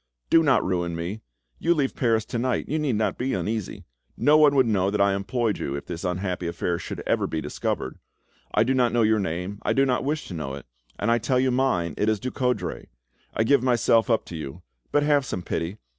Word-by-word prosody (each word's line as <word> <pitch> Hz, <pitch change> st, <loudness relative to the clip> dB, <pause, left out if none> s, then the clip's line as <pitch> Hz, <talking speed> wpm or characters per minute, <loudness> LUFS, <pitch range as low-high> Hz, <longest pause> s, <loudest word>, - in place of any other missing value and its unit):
Do 165 Hz, -, +7 dB
not 140 Hz, -7 st, +3 dB
ruin 85 Hz, -2 st, -1 dB
me! 90 Hz, +6 st, -4 dB, 0.4 s
You 170 Hz, +1 st, +2 dB
leave 140 Hz, -4 st, 0 dB
Paris 115 Hz, -3 st, +1 dB
to 120 Hz, -, -3 dB
night, 130 Hz, +1 st, -1 dB
you 155 Hz, +3 st, -1 dB
need 145 Hz, -6 st, 0 dB
not 105 Hz, -2 st, -1 dB
be 130 Hz, -1 st, 0 dB
uneasy; 105 Hz, +3 st, -3 dB, 0.3 s
no 150 Hz, -, +4 dB
one 150 Hz, -2 st, +6 dB
would 130 Hz, -2 st, +5 dB
know 100 Hz, -4 st, +1 dB
that 105 Hz, +1 st, -1 dB
I 100 Hz, 0 st, +4 dB
employed 110 Hz, +2 st, -1 dB
you, 70 Hz, -, -3 dB
if 70 Hz, -, -6 dB
this 85 Hz, 0 st, -6 dB
unhappy 90 Hz, -1 st, -2 dB
affair 85 Hz, 0 st, -2 dB
should -, -, -6 dB
ever -, -, +1 dB
be 80 Hz, -, -3 dB
discovered. -, -, -3 dB, 0.5 s
I 105 Hz, -, +3 dB
do 130 Hz, +3 st, +1 dB
not 125 Hz, -3 st, +2 dB
know 120 Hz, -1 st, +3 dB
your 110 Hz, 0 st, +3 dB
name, 90 Hz, +2 st, -3 dB
I -, -, 0 dB
do 135 Hz, -, +3 dB
not 125 Hz, -2 st, 0 dB
wish 150 Hz, +2 st, -2 dB
to -, -, -6 dB
know 70 Hz, -5 st, -4 dB
it, 70 Hz, -, -10 dB, 0.3 s
and 110 Hz, +3 st, 0 dB
I 120 Hz, -, +3 dB
tell 125 Hz, +3 st, +1 dB
you 130 Hz, 0 st, +2 dB
mine, 105 Hz, -, +1 dB
it 105 Hz, -, +2 dB
is 110 Hz, -2 st, +1 dB
Ducoudray. 125 Hz, +1 st, -2 dB, 0.5 s
I 110 Hz, -, +2 dB
give 140 Hz, +3 st, +4 dB
myself 120 Hz, -2 st, +3 dB
up 115 Hz, -2 st, +2 dB
to 85 Hz, -, -8 dB
you, 80 Hz, +2 st, -7 dB, 0.3 s
but 145 Hz, -, +3 dB
have 145 Hz, -1 st, +3 dB
some 90 Hz, -8 st, -4 dB
pity! 85 Hz, +5 st, -3 dB
110 Hz, 230 wpm, -25 LUFS, 90-130 Hz, 0.5 s, Do